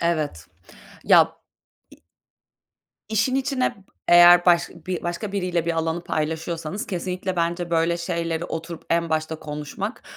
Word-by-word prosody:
Evet. 155 Hz, -, -1 dB, 0.6 s
Ya -, -, +5 dB, 0.5 s
İ -, -, -16 dB, 1.1 s
İşin 220 Hz, +4 st, +1 dB
içine 270 Hz, -1 st, 0 dB
b 195 Hz, -, -19 dB, 0.3 s
eğer 175 Hz, 0 st, +8 dB
başka 170 Hz, -1 st, +2 dB
bi 180 Hz, -1 st, -2 dB
başka 175 Hz, +4 st, -4 dB
biriyle 180 Hz, -4 st, -1 dB
bir 170 Hz, -, +1 dB
alanı 165 Hz, +1 st, -2 dB
paylaşıyorsanız 160 Hz, +4 st, -3 dB
kesinlikle 185 Hz, 0 st, -3 dB
bence 170 Hz, +1 st, -1 dB
böyle 165 Hz, +1 st, +2 dB
şeyleri 170 Hz, -1 st, -2 dB
oturup 165 Hz, 0 st, -6 dB
en 170 Hz, 0 st, +1 dB
başta 160 Hz, 0 st, -1 dB
konuşmak 150 Hz, -, -6 dB
170 Hz, 130 wpm, -23 LUFS, 160-180 Hz, 1.1 s, eğer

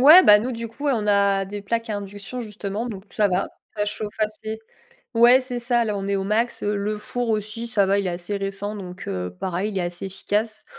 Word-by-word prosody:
ouais, 310 Hz, +8 st, +10 dB
bah, 210 Hz, 0 st, +9 dB
nous, 245 Hz, +5 st, -2 dB
du 230 Hz, 0 st, -4 dB
coup, 285 Hz, +6 st, -4 dB
on 225 Hz, -6 st, +1 dB
a 200 Hz, -1 st, +3 dB
des 200 Hz, +1 st, -6 dB
plaques 230 Hz, +3 st, -2 dB
à 205 Hz, -, -1 dB
induction, 205 Hz, +5 st, -6 dB
justement, 210 Hz, 0 st, -4 dB
donc 195 Hz, -4 st, -7 dB
ça 210 Hz, -2 st, +2 dB
va, 185 Hz, +1 st, +1 dB, 0.3 s
ça 205 Hz, -, +1 dB
chauffe 210 Hz, 0 st, -4 dB
assez. 215 Hz, 0 st, -2 dB, 0.6 s
Ouais, 240 Hz, +3 st, +7 dB
c'est 250 Hz, -2 st, -4 dB
ça, 240 Hz, 0 st, +2 dB
là, 210 Hz, -2 st, -1 dB
on 195 Hz, 0 st, -3 dB
est 200 Hz, -, +1 dB
au 195 Hz, -, -1 dB
max. 225 Hz, +4 st, 0 dB
Le 210 Hz, +1 st, -1 dB
four 240 Hz, +2 st, -2 dB
aussi, 215 Hz, +2 st, -2 dB
ça 205 Hz, -4 st, +3 dB
va, 200 Hz, +1 st, +3 dB
il 200 Hz, -, -1 dB
est -, -, 0 dB
assez 175 Hz, +4 st, -3 dB
récent, 195 Hz, +1 st, -3 dB
donc 185 Hz, -1 st, -8 dB
heu, 90 Hz, -2 st, -3 dB
pareil, 190 Hz, +3 st, -1 dB
il 195 Hz, -, -1 dB
est -, -, 0 dB
assez 175 Hz, +2 st, -4 dB
efficace. 210 Hz, +3 st, +1 dB
210 Hz, 235 wpm, -23 LUFS, 195-230 Hz, 0.6 s, ouais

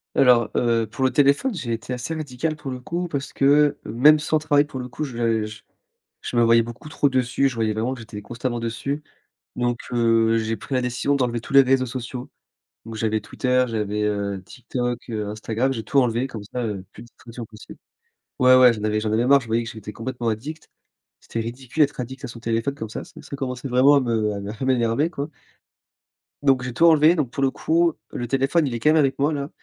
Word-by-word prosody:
Alors, 120 Hz, -4 st, +5 dB
heu, 115 Hz, -1 st, +2 dB
pour 130 Hz, +5 st, -2 dB
le 130 Hz, -, +2 dB
téléphone, 145 Hz, -, +3 dB
j'ai 130 Hz, -, -4 dB
été 115 Hz, +2 st, -3 dB
assez 125 Hz, +6 st, -4 dB
radical 155 Hz, 0 st, -3 dB
pour 150 Hz, -2 st, -7 dB
le 130 Hz, -1 st, -5 dB
coup 175 Hz, +7 st, -3 dB
parce 140 Hz, -4 st, -4 dB
que, 145 Hz, +1 st, +3 dB
même 150 Hz, +7 st, +5 dB
sans 155 Hz, +1 st, +1 dB
travail 150 Hz, -2 st, +3 dB
pour 145 Hz, -, -8 dB
le 125 Hz, -, -7 dB
coup, 150 Hz, +5 st, -4 dB
je 115 Hz, -4 st, -1 dB
j 110 Hz, 0 st, -10 dB, 0.6 s
je -, -, -5 dB
me 120 Hz, -, +4 dB
voyais 115 Hz, 0 st, +5 dB
beaucoup 120 Hz, +6 st, -9 dB
trop 145 Hz, -1 st, +1 dB
dessus. 130 Hz, +1 st, +1 dB
Je 135 Hz, -, -3 dB
voyais 110 Hz, -2 st, 0 dB
vraiment 115 Hz, +4 st, -1 dB
que 130 Hz, -, -9 dB
j'étais 105 Hz, -2 st, -9 dB
constamment 120 Hz, +1 st, -3 dB
dessus. 120 Hz, +6 st, -3 dB, 0.5 s
Donc, 120 Hz, -1 st, 0 dB, 0.2 s
heu, 115 Hz, -1 st, +3 dB
j'ai 110 Hz, 0 st, -1 dB
pris 135 Hz, -, -6 dB
la 130 Hz, -, +1 dB
décision 125 Hz, +3 st, 0 dB
d'enlever 120 Hz, -3 st, 0 dB
tous 120 Hz, -, -9 dB
les 140 Hz, -, +9 dB
réseaux 130 Hz, 0 st, +2 dB
sociaux. 125 Hz, 0 st, -6 dB, 0.6 s
Donc, 115 Hz, -, -7 dB
j'avais 110 Hz, 0 st, 0 dB
Twitter, 125 Hz, +4 st, 0 dB
j'avais, 105 Hz, -2 st, -2 dB
heu, 100 Hz, -2 st, -2 dB
TikTok, 125 Hz, +3 st, -4 dB
heu, 105 Hz, -2 st, -3 dB
Instagram. 110 Hz, +4 st, -1 dB
J'ai 115 Hz, -, -4 dB
tout 140 Hz, -, 0 dB
enlevé 120 Hz, 0 st, +1 dB
comme 110 Hz, -5 st, -8 dB
ça, 125 Hz, +3 st, -4 dB
heu, 105 Hz, -4 st, -3 dB
plus -, -, -12 dB
de 120 Hz, -, -14 dB
distraction 120 Hz, 0 st, -10 dB
possible. 110 Hz, -1 st, -13 dB, 0.6 s
Ouais, 130 Hz, 0 st, +6 dB
ouais, 130 Hz, -1 st, +7 dB
j'en 105 Hz, -2 st, -6 dB
avais 105 Hz, 0 st, +1 dB
j'en 110 Hz, 0 st, -2 dB
avais 115 Hz, +3 st, +1 dB
marre. 140 Hz, +1 st, +6 dB
Je 120 Hz, -, -12 dB
voyais 115 Hz, +1 st, +1 dB
que 115 Hz, -, -6 dB
j'étais 110 Hz, -1 st, -9 dB
complètement 120 Hz, +2 st, -4 dB
addict. 135 Hz, +9 st, -5 dB, 0.5 s
C'était 115 Hz, -, -5 dB
ridicule 125 Hz, +6 st, -2 dB
d'être 145 Hz, 0 st, +1 dB
addict 130 Hz, +3 st, -7 dB
à -, -, -4 dB
son 115 Hz, -, -9 dB
téléphone 115 Hz, +4 st, -1 dB
comme 110 Hz, -6 st, -6 dB
ça. -, -, -5 dB
Ça -, -, -14 dB
ça -, -, -9 dB
commençait 130 Hz, -1 st, -4 dB
vraiment 130 Hz, +3 st, +5 dB
à -, -, +5 dB
me 115 Hz, -4 st, 0 dB
à 105 Hz, +5 st, -5 dB
m'énerver, 130 Hz, +4 st, +1 dB
quoi. 145 Hz, -3 st, -4 dB, 1.2 s
Donc, 135 Hz, -3 st, +3 dB
j'ai 125 Hz, -1 st, -4 dB
tout 165 Hz, -, +3 dB
enlevé. 160 Hz, 0 st, +6 dB
Donc, 150 Hz, -7 st, -1 dB
pour 140 Hz, 0 st, -2 dB
le 135 Hz, -, +3 dB
coup, 165 Hz, +3 st, +1 dB, 0.2 s
le 120 Hz, -, -4 dB
téléphone, 135 Hz, +6 st, +2 dB
il 130 Hz, -, -3 dB
est 120 Hz, -, -3 dB
quand 135 Hz, -, +3 dB
même 155 Hz, -, +5 dB
avec 135 Hz, -3 st, +2 dB
moi, 145 Hz, +3 st, +2 dB
là, 140 Hz, -1 st, -3 dB
125 Hz, 225 wpm, -23 LUFS, 115-140 Hz, 1.2 s, les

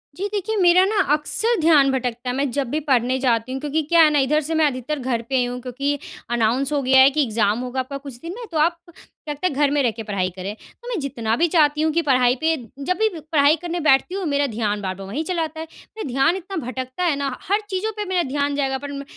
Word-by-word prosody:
जी 395 Hz, +4 st, -3 dB
देखिए, 420 Hz, +1 st, -2 dB
मेरा 355 Hz, +1 st, +6 dB
ना 425 Hz, +2 st, -1 dB, 0.2 s
अक्सर 440 Hz, +9 st, +1 dB
ध्यान 300 Hz, -4 st, +5 dB
भटकता 250 Hz, -1 st, -3 dB
है, 250 Hz, -, -2 dB
मैं 275 Hz, 0 st, 0 dB
जब 275 Hz, -2 st, -2 dB
भी 305 Hz, +5 st, -1 dB
पढ़ने 255 Hz, 0 st, +2 dB
जाती 245 Hz, -1 st, 0 dB
हूँ। 265 Hz, -, -3 dB
क्योंकि 300 Hz, +2 st, -1 dB
क्या 335 Hz, -1 st, +6 dB
है 305 Hz, -, +6 dB
ना 290 Hz, -, +3 dB
इधर 295 Hz, +3 st, +2 dB
से 325 Hz, -, -2 dB
मैं 315 Hz, -1 st, +4 dB
अधिकतर 275 Hz, +2 st, -2 dB
घर 245 Hz, -2 st, -1 dB
पे 265 Hz, -, 0 dB
ही 250 Hz, -, +2 dB
हूँ 245 Hz, 0 st, -5 dB
क्योंकि 275 Hz, +3 st, -2 dB, 0.3 s
अनाउंस 240 Hz, +4 st, +1 dB
हो 285 Hz, -, +1 dB
गया 265 Hz, 0 st, +4 dB
है 270 Hz, -, +8 dB
कि 295 Hz, +1 st, +1 dB
एग्जाम 220 Hz, -1 st, +1 dB
होगा 255 Hz, +1 st, -4 dB
आपका 270 Hz, +2 st, -4 dB
कुछ 275 Hz, -3 st, -9 dB
दिन 335 Hz, +1 st, -6 dB
में। 480 Hz, -, -7 dB
तो 320 Hz, -, -2 dB
आप 335 Hz, +3 st, +2 dB, 0.5 s
तब 295 Hz, -1 st, -4 dB
तक 365 Hz, -, +2 dB
घर 285 Hz, 0 st, +2 dB
में 290 Hz, -1 st, +2 dB
रह 240 Hz, -, +2 dB
के 225 Hz, 0 st, -8 dB
पढ़ाई 195 Hz, -3 st, -1 dB
करें। 190 Hz, +2 st, -5 dB, 0.3 s
तो 485 Hz, -, -12 dB
मैं 455 Hz, -8 st, -2 dB
जितना 230 Hz, -5 st, -2 dB
भी 345 Hz, -, +3 dB
चाहती 300 Hz, -3 st, +3 dB
हूँ 315 Hz, -, +2 dB
कि 335 Hz, -, +2 dB
पढ़ाई 255 Hz, -3 st, +3 dB
पे 320 Hz, +1 st, +2 dB, 0.3 s
जब 365 Hz, +5 st, -1 dB
भी 440 Hz, 0 st, +3 dB
पढ़ाई 305 Hz, -1 st, +3 dB
करने 350 Hz, 0 st, -3 dB
बैठती 310 Hz, +4 st, +3 dB
हूँ 390 Hz, -, -3 dB
मेरा 285 Hz, -1 st, +1 dB
ध्यान 210 Hz, -3 st, -2 dB
बार-बार 190 Hz, 0 st, -5 dB
वही 290 Hz, +11 st, -3 dB
चला 340 Hz, -1 st, -1 dB
आता 315 Hz, 0 st, -6 dB
है। 320 Hz, -, -6 dB, 0.3 s
मैं 435 Hz, -, -4 dB
ध्यान 270 Hz, +7 st, +2 dB
इतना 385 Hz, +1 st, -7 dB
भटकता 255 Hz, +6 st, -4 dB
है 335 Hz, -5 st, +2 dB
ना, 280 Hz, 0 st, -2 dB, 0.2 s
हर 410 Hz, +2 st, +3 dB
चीज़ों 385 Hz, +3 st, -2 dB
पे 420 Hz, -, -2 dB
मेरा 365 Hz, -2 st, 0 dB
ध्यान 285 Hz, 0 st, -1 dB
जाएगा 270 Hz, -2 st, 0 dB
पर 285 Hz, +1 st, -7 dB
म 280 Hz, 0 st, -6 dB
280 Hz, 265 wpm, -22 LUFS, 255-325 Hz, 0.5 s, है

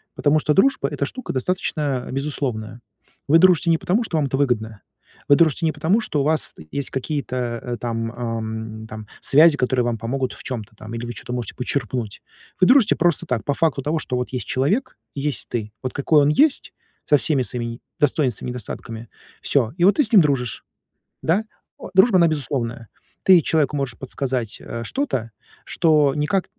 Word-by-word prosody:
Потому 150 Hz, +1 st, +2 dB
что 150 Hz, 0 st, +1 dB
дружба 195 Hz, -, +3 dB
это 140 Hz, -, -2 dB
штука 255 Hz, -, -6 dB
достаточно 140 Hz, -2 st, -1 dB
безусловная. 130 Hz, -5 st, -3 dB, 0.5 s
Вы 160 Hz, +3 st, +6 dB
дружите 180 Hz, -1 st, +4 dB
не 165 Hz, -, +4 dB
потому, 200 Hz, +8 st, 0 dB
что 170 Hz, -, -4 dB
вам 145 Hz, -, +1 dB
это 135 Hz, 0 st, -2 dB
выгодно. 110 Hz, -6 st, -1 dB, 0.5 s
Вы 145 Hz, -, +7 dB
дружите 165 Hz, 0 st, +2 dB
не 160 Hz, -, +2 dB
потому, 185 Hz, +9 st, +1 dB
что 150 Hz, -, -1 dB
у 140 Hz, -, +1 dB
вас, 155 Hz, +1 st, +1 dB
э, -, -, -10 dB
есть 140 Hz, -1 st, -4 dB
какие-то, 135 Hz, 0 st, -3 dB
э, 120 Hz, -1 st, -3 dB
там 115 Hz, 0 st, -3 dB
ам, 110 Hz, -2 st, -5 dB
там 110 Hz, -1 st, -9 dB
связи, 155 Hz, +2 st, +6 dB
которые 125 Hz, -1 st, +1 dB
вам 120 Hz, -1 st, -1 dB
помогут 130 Hz, +4 st, -3 dB
в -, -, -12 dB
чём-то 115 Hz, -3 st, -6 dB
там 110 Hz, +1 st, -10 dB
или 115 Hz, +1 st, -4 dB
вы 120 Hz, -, -5 dB
чё-то 120 Hz, -, -7 dB
можете 120 Hz, -2 st, -4 dB
почерпнуть. 125 Hz, -4 st, -3 dB, 0.4 s
Вы 185 Hz, -, +5 dB
дружите 255 Hz, -4 st, +5 dB
просто 175 Hz, -3 st, +1 dB
так, 120 Hz, -4 st, -2 dB
по 145 Hz, -, +1 dB
факту 155 Hz, -2 st, 0 dB
того, 150 Hz, +4 st, -1 dB
что 130 Hz, -4 st, -2 dB
вот 125 Hz, -, -3 dB
есть 125 Hz, -, -3 dB
человек 150 Hz, -, -1 dB, 0.2 s
и 140 Hz, -, -4 dB
есть 145 Hz, -3 st, -1 dB
ты. 110 Hz, -3 st, -4 dB
Вот 130 Hz, -1 st, -4 dB
какой 145 Hz, +2 st, +3 dB
он 145 Hz, -, +3 dB
есть 280 Hz, -, +3 dB, 0.4 s
со 150 Hz, -, +6 dB
всеми 140 Hz, -3 st, +1 dB
своими 120 Hz, -1 st, -3 dB
не 115 Hz, +1 st, -6 dB, 0.2 s
достоинствами 135 Hz, -5 st, 0 dB
и -, -, -3 dB
недостатками, 115 Hz, -1 st, -7 dB, 0.3 s
всё, 120 Hz, -6 st, +1 dB
и 175 Hz, -, +3 dB
вот 200 Hz, -, +5 dB
ты 300 Hz, -, +3 dB
с 230 Hz, -, +1 dB
ним 205 Hz, -, +8 dB
дружишь. 135 Hz, -6 st, -1 dB, 0.6 s
Да? 185 Hz, +7 st, +2 dB, 0.4 s
О, -, -, -9 dB
дружба 190 Hz, +2 st, +6 dB
она 170 Hz, -, +5 dB
безусловная. 120 Hz, -6 st, -3 dB, 0.4 s
Ты 185 Hz, -2 st, +7 dB
человеку 150 Hz, -2 st, +1 dB
можешь 135 Hz, -5 st, -3 dB
подсказать, 130 Hz, -4 st, -3 dB
э, 115 Hz, -, -6 dB
что-то, 130 Hz, -, -2 dB, 0.3 s
что 150 Hz, -5 st, +3 dB
никак, 155 Hz, +6 st, 0 dB
135 Hz, 195 wpm, -22 LUFS, 120-155 Hz, 0.6 s, ним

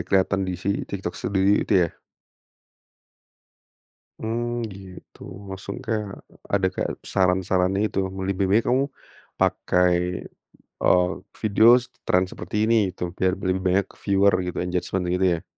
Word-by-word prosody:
kelihatan 95 Hz, 0 st, +2 dB
di -, -, -1 dB
si 100 Hz, -, -2 dB, 0.2 s
TikTok 95 Hz, -3 st, -4 dB
Studio 100 Hz, +1 st, +2 dB
itu -, -, -3 dB, 0.2 s
ya? -, -, -24 dB, 2.2 s
Mmm, 120 Hz, +1 st, -2 dB
gitu, 95 Hz, -2 st, -13 dB, 0.3 s
langsung 95 Hz, +1 st, -6 dB
kayak— 105 Hz, -3 st, -3 dB, 0.4 s
ada 100 Hz, -2 st, +3 dB
kayak -, -, -2 dB, 0.2 s
saran-saran 90 Hz, 0 st, +2 dB
itu 105 Hz, -1 st, 0 dB, 0.3 s
lebih 100 Hz, 0 st, 0 dB
baik 110 Hz, +4 st, +4 dB
kamu, 130 Hz, +2 st, +3 dB, 0.6 s
pakai, 90 Hz, 0 st, +1 dB, 0.6 s
eee, 90 Hz, 0 st, +4 dB, 0.3 s
video 110 Hz, +1 st, +4 dB
s -, -, -10 dB, 0.2 s
tren 90 Hz, 0 st, +4 dB
seperti 90 Hz, +4 st, -7 dB
ini 115 Hz, +1 st, +3 dB
itu 90 Hz, -, -7 dB
biar 95 Hz, 0 st, +2 dB
lebih 95 Hz, -1 st, -1 dB
banyak 95 Hz, +1 st, +2 dB, 0.2 s
viewer 100 Hz, 0 st, +3 dB
gitu, 90 Hz, -, -5 dB
engagement 90 Hz, +1 st, -2 dB
gitu 95 Hz, +1 st, +2 dB
ya? -, -, -11 dB
95 Hz, 130 wpm, -24 LUFS, 90-100 Hz, 2.2 s, baik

